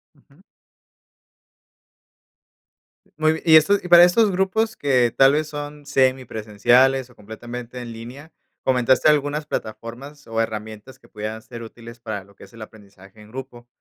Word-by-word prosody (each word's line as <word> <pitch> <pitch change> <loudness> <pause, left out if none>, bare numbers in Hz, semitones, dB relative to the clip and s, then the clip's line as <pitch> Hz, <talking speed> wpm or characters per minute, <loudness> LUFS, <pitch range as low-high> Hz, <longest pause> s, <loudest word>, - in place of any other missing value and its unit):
Ujú. - - -26 2.8
Muy 155 +1 +1
y 160 -1 +8
esto 200 +6 +4
y 180 - -8
para 175 0 +9
estos 200 +4 +4
grupos 205 +4 0
que 125 -5 +1
tal 135 +1 +5
vez 155 0 0
son 145 -1 -8
semipresenciales 130 -1 +1
o - - -22
completamente 120 +3 -9
en 120 -1 -8
línea, 130 +8 -11 0.3
comentaste 130 +1 +2
algunas 150 0 +1
plataformas 135 +4 -7
o 115 0 -2
herramientas 110 +3 -6
que - - -22
pudieran 110 +1 -6
ser 120 -1 -10
útiles 115 +1 -12
para 110 -4 -6
lo 100 0 -22
que - - -14
es - - -22
el 115 - -13
aprendizaje 100 -1 -17
en 105 - -16
grupo. 125 -1 -10
125 Hz, 150 wpm, -21 LUFS, 115-145 Hz, 2.8 s, para